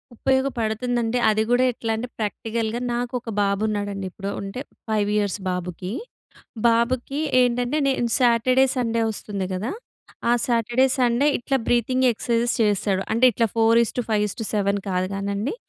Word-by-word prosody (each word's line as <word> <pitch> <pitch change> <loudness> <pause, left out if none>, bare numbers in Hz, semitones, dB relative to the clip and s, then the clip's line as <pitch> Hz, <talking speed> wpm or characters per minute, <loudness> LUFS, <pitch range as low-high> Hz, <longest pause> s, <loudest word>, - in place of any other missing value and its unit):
ఉపయోగపడుతుందంటే, 240 -2 0
అది 215 0 +2
కూడా 245 +1 +4
ఎట్లా 225 -1 -3
అంటే 230 +3 -4
ప్రాక్టికల్‌గా 225 +1 -2
నాకు 240 +1 -3
ఒక 235 - -9
బాబు 200 0 +1
ఉన్నాడండి 205 -2 -3
ఇప్పుడు. 195 +2 -6
ఉంటే, 200 +6 -5 0.3
5 210 -2 +1
ఇయర్స్ 205 -1 -1
బాబుకి. 180 +1 -4 0.8
బాబుకి 245 +4 +1 0.2
ఏంటంటే 245 +3 +1
నేను 245 -3 0
సాటర్‌డే, 255 +1 +4
సండే 230 -2 0
వస్తుంది 200 -2 -4
కదా! 205 +7 -3 0.6
ఆ - - +5
సాటర్‌డే, 240 +2 +2
సండే 245 +2 +2
ఇట్లా 270 +3 0
బ్రీతింగ్ 255 +2 +2
ఎక్ససైజ్స్ 235 +1 0
చేస్తాడు. 200 -2 +1
అంటే 230 +3 +3
ఇట్లా 230 +2 +1
4:5:7 220 -3 +1
కాదు 185 -1 0
కానండి. 200 - -2
230 Hz, 130 wpm, -23 LUFS, 205-245 Hz, 0.8 s, ఆ